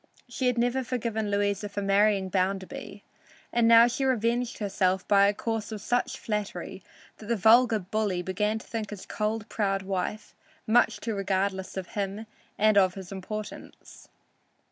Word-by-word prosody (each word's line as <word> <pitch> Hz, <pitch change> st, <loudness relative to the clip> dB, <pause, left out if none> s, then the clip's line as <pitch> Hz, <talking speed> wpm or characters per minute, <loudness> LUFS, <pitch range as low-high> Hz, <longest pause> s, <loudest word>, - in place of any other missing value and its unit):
She 250 Hz, +1 st, -2 dB
had 250 Hz, -1 st, +1 dB
never 245 Hz, +2 st, +1 dB
forgiven 225 Hz, -3 st, -2 dB
Louisa 205 Hz, 0 st, 0 dB
for 205 Hz, 0 st, -4 dB
marrying 200 Hz, -1 st, +3 dB
Bounderby, 195 Hz, +1 st, -3 dB, 0.5 s
and 235 Hz, -1 st, +3 dB, 0.2 s
she 270 Hz, -, -2 dB
now 265 Hz, -, +2 dB
revenged 240 Hz, 0 st, 0 dB
herself 190 Hz, -2 st, 0 dB
by 200 Hz, -1 st, +5 dB
a 205 Hz, -, +2 dB
course 225 Hz, -1 st, -3 dB
of 215 Hz, -, -5 dB
such 245 Hz, +5 st, -1 dB
flattery 210 Hz, -2 st, -4 dB, 0.4 s
that 215 Hz, -, -11 dB
the 235 Hz, -, +1 dB
vulgar 225 Hz, +2 st, +5 dB
bully 195 Hz, -2 st, -2 dB
began 210 Hz, +4 st, -1 dB
to 220 Hz, -, -10 dB
think 220 Hz, -3 st, -4 dB
his 205 Hz, -3 st, -8 dB
cold, 215 Hz, 0 st, -2 dB
proud 195 Hz, -3 st, -1 dB
wife 190 Hz, +2 st, -3 dB, 0.3 s
much 235 Hz, +2 st, +3 dB
too 225 Hz, -, -2 dB
regardless 195 Hz, -1 st, -2 dB
of 185 Hz, -2 st, -5 dB
him 200 Hz, +1 st, -4 dB, 0.3 s
and 215 Hz, -1 st, +5 dB
of 185 Hz, -2 st, +2 dB
his 190 Hz, -1 st, -9 dB
importance. 210 Hz, +2 st, -8 dB
210 Hz, 160 wpm, -27 LUFS, 195-225 Hz, 0.5 s, by